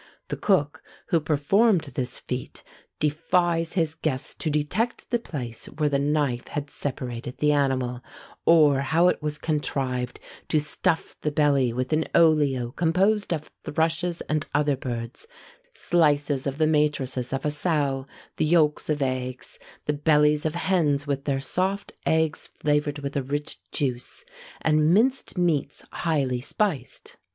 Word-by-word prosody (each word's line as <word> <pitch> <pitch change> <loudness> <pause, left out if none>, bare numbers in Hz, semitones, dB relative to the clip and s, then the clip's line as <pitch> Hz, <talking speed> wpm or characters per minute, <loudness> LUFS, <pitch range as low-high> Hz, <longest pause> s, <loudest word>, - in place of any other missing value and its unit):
The - - -2
cook 160 -6 +1 0.3
who 170 - +3
performed 165 +7 +3
this 125 0 -2
feat 125 0 -6 0.3
defies 165 +2 +1
his 165 -4 +1
guests 155 -5 -2
to 160 - -3
detect 150 +11 -1
the 240 - +2
place 125 - -6
where 150 0 -1
the 140 -1 +1
knife 140 -4 0
had 145 -1 -5
separated 125 -3 -4
the 150 0 +3
animal, 130 -4 0 0.4
or 150 -5 +5
how 160 +6 +3
it - - -1
was 150 0 -2
contrived 135 -5 -2 0.3
to 155 - +2
stuff 150 +2 0
the 150 - 0
belly 145 -4 +2
with 130 +5 -2
an 155 +1 +2
olio 145 -7 +3
composed 185 +8 +1
of 155 -3 -3
thrushes 165 +3 0
and 155 -1 -1
other 145 -1 +3
birds, 120 - -5 0.4
slices 145 - +1
of 135 0 -3
the 155 - +3
matrices 140 -5 +1
of 135 +2 -2
a 150 - +2
sow, 145 -4 0 0.3
the - - +2
yolks 155 -2 +2
of 150 -2 +1
eggs, 130 -1 -4 0.3
the 150 - +1
bellies 150 0 +3
of 155 - -4
hens 155 -6 +1
with 140 -1 -2
their 140 -2 0
soft 185 +8 -1 0.2
eggs 160 -2 +1
flavoured 150 0 0
with 140 -1 -5
a 140 - +1
rich 145 +3 -4
juice, 130 - -3 0.4
and 155 +2 +3
minced 255 0 +2
meats 160 -5 0
highly 140 -7 0
spiced. 145 - -3
150 Hz, 145 wpm, -25 LUFS, 135-160 Hz, 0.4 s, or